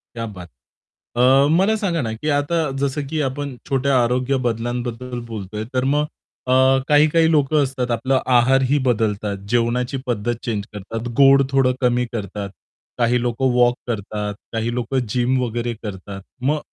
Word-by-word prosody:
क्या 115 -1 -3
बात 95 -5 -9 0.7
है! 120 - +4 0.2
अ, - - +2
मला 200 +4 +3
सांगा 185 -7 -1
ना 110 -3 -3
की 135 +8 -4
आता 155 +2 0
जसं 140 +1 -1
की 155 +2 -2
आपण 140 0 -3
छोट्या 135 -1 +2
आरोग्य 125 +3 0
बदलांबद्दल 120 +1 -3
बोलतोय, 105 0 -5
तर 130 0 +1
मग 150 0 +1 0.4
अ, - - +1 0.4
काही-काही 155 +2 +4
लोक 150 -2 +2
असतात 130 -4 0
आपला 130 +3 +1 0.2
आहारही 135 +3 +4
बदलतात, 105 -4 0
जेवणाची 120 +2 0
पद्धत 120 -1 -1
चेंज 110 -5 -2
करतात, 110 +4 -6
गोड 140 0 +7
थोडं 135 -2 +3
कमी 125 -1 +2
करतात, 100 -2 -4 0.5
काही 120 0 +2
लोक 120 0 -2
वॉक 125 -2 +3
करतात, 105 -2 -3 0.2
काही 115 +1 -1
लोक 125 +2 -3
जिम 125 +3 +1
वगैरे 120 0 -2
करतात. 100 -1 -7 0.2
मग 145 +4 +1
125 Hz, 155 wpm, -21 LUFS, 115-135 Hz, 0.7 s, गोड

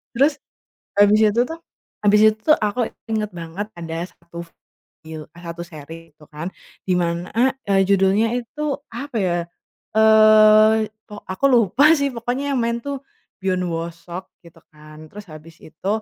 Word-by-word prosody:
Terus, 285 +3 +2 0.6
habis 205 +1 +5
itu 215 +2 +3
tuh, 325 +5 -7 0.4
habis 210 0 +4
itu - - -6
tuh 310 0 +4
aku 215 +3 -1 0.2
inget 215 -1 -1
banget 170 +4 -6
ada 165 0 -5
1, 170 -1 -11 0.6
fil 155 -1 -8
eh, 170 - -14
1 170 +1 -6
seri 165 0 -11
tuh 150 - -17
kan. 155 +5 -6 0.4
Dimana, 175 -1 -1 0.4
eee, 195 -1 +3
judulnya 200 +4 +2
itu 290 +3 -4
apa 250 +2 -7
ya? 175 -3 0 0.6
Eee, 215 0 +6 0.2
o - - -6
aku 190 +9 -6
lupa 245 - +4
sih 280 -1 0
pokoknya 250 +5 -3
yang - - 0
main 235 0 -1
tuh 280 -2 -4 0.4
Byeon 185 -1 0
Woo 165 +1 -3
Seok 170 +2 -11
gitu 170 - -17
kan. 155 +1 -14
Terus 205 0 -11
habis 155 +1 -13
itu 160 +5 -8
200 Hz, 155 wpm, -21 LUFS, 170-230 Hz, 0.6 s, Eee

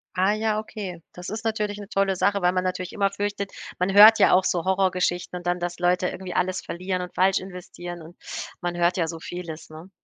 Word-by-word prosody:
Ah 190 +3 +3
ja, 215 0 0
okay. 195 -5 -7
Das 180 0 -8
ist 220 +2 -5
natürlich 210 -2 -1
'ne 205 - -8
tolle 195 -2 +1
Sache, 200 +1 +2
weil 180 0 +4
man 185 0 -1
natürlich 185 -1 -3
immer 200 -2 +1
fürchtet 200 0 -3 0.3
man 185 +2 +1
hört 215 +2 +9
ja - - +6
auch 185 - +5
so 175 -1 0
Horrorgeschichten 185 -2 0
und 175 0 -7
dann, 175 0 +1
dass 175 0 -3
Leute 180 +1 +2
irgendwie 185 -1 -6
alles 185 +1 0
verlieren 185 +1 -3
und 180 - -7
falsch 190 +1 +3
investieren 175 -2 -8
und 165 +2 -13 0.4
man 175 0 -3
hört 175 +1 +2
ja 165 -2 +1
so 165 0 -6
vieles, 165 -2 -7
ne? 160 +4 -11
185 Hz, 220 wpm, -25 LUFS, 175-195 Hz, 0.4 s, hört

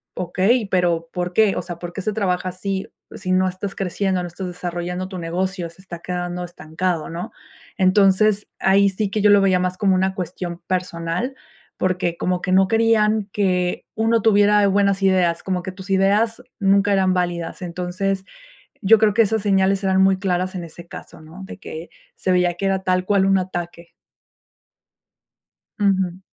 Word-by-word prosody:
okey, 195 +6 +1
pero, 170 -3 0
¿por 180 0 -2
qué? 215 0 +3
O - - -1
sea, 175 -2 -7
¿por 175 0 -7
qué 195 - -5
se 215 - -1
trabaja 185 -3 -1
así 190 +1 -4 0.3
si 185 - -4
no 185 0 +3
estás 185 +2 -5
creciendo, 190 0 -1
no - - -4
estás 180 +2 -6
desarrollando 180 +1 -4
tu 185 - -6
negocio, 175 +1 -3
se 170 +3 -18
está 170 -3 -8
quedando 180 0 -4
estancado?", 170 0 -3
¿no? 170 +2 -6 0.5
Entonces, 195 +2 +3
ahí 200 +1 +4
sí 195 +1 -2
que 215 - -1
yo 210 - +5
lo 205 -1 +6
veía 185 -2 +3
más 180 0 -2
como 195 -2 +2
una 190 +1 0
cuestión 175 -1 -5
personal, 180 +6 -2 0.4
porque 180 -2 -1
como 180 0 -1
que 185 - -2
no 190 0 +5
querían 220 -2 +2
que 180 -3 0
uno 225 0 +2
tuviera 205 -1 +4
buenas 200 0 +2
ideas, 180 -3 +2
como 185 -2 -2
que 190 - -5
tus 190 +1 -12
ideas 205 +4 +2 0.2
nunca 200 +1 +3
eran 190 -1 +3
válidas. 175 -1 -2
Entonces, 180 +2 -3 0.6
yo 215 +3 +6
creo 215 -2 +4
que 230 - +5
esas 220 0 0
señales 195 -1 +2
eran 190 0 +2
muy 190 0 +4
claras 185 -1 -1
en 180 - -4
ese 170 +1 -12
caso, 175 - -11
¿no?, 160 +5 -12
de 195 - -10
que 165 -2 -8 0.3
se 185 - -2
veía 180 -1 +2
que 195 +3 -3
era 195 -1 +1
tal 185 0 +1
cual 200 -2 +3
un 195 0 +4
ataque. 175 -2 -6 1.9
Ujú. 190 -3 +1
185 Hz, 180 wpm, -21 LUFS, 180-200 Hz, 1.9 s, lo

